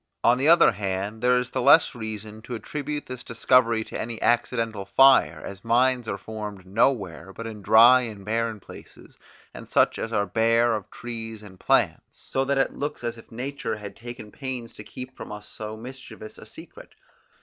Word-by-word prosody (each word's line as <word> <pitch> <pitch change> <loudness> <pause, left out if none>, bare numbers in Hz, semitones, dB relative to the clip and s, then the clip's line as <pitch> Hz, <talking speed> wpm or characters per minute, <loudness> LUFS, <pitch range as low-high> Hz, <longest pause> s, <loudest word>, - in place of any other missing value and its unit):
On 120 +1 +4
the 140 - +2
other 170 +1 +7
hand, 100 +2 -4
there 125 0 +4
is 125 0 -1
the 130 - -1
less 140 +5 +6
reason 110 -2 -7
to 120 +2 -6
attribute 145 +6 -5
this 125 -1 -8
discovery 115 -1 +2
to - - -6
any 115 -1 -5
accidental 115 -3 0
fire, 135 +6 +4
as 95 -1 -9
mines 125 +1 +2
are 100 - -3
formed 105 -3 -7
nowhere 95 - 0
but 115 +4 -8
in 110 -2 -7
dry 120 +5 +7
and 105 -5 -7
barren 115 0 -1
places, - - -14 0.3
and - - -10
such - - +2
as 115 - -4
are 105 -2 +1
bare 115 +4 +2
of 105 -4 -4
trees 115 -2 -7
and 95 -3 -14
plants, - - 0
so 135 - -2
that 140 0 0
it 135 - +1
looks 145 -2 -5
as 120 -1 -4
if - - -17
nature 125 -1 -4
had 105 -1 -9
taken 115 -3 -10
pains 130 -3 -6
to 105 - -10
keep 130 +4 -10
from - - -9
us 105 0 -8
so 110 0 -7
mischievous 115 -3 -11
a - - -12
secret. - - -13
115 Hz, 190 wpm, -25 LUFS, 105-125 Hz, 0.3 s, other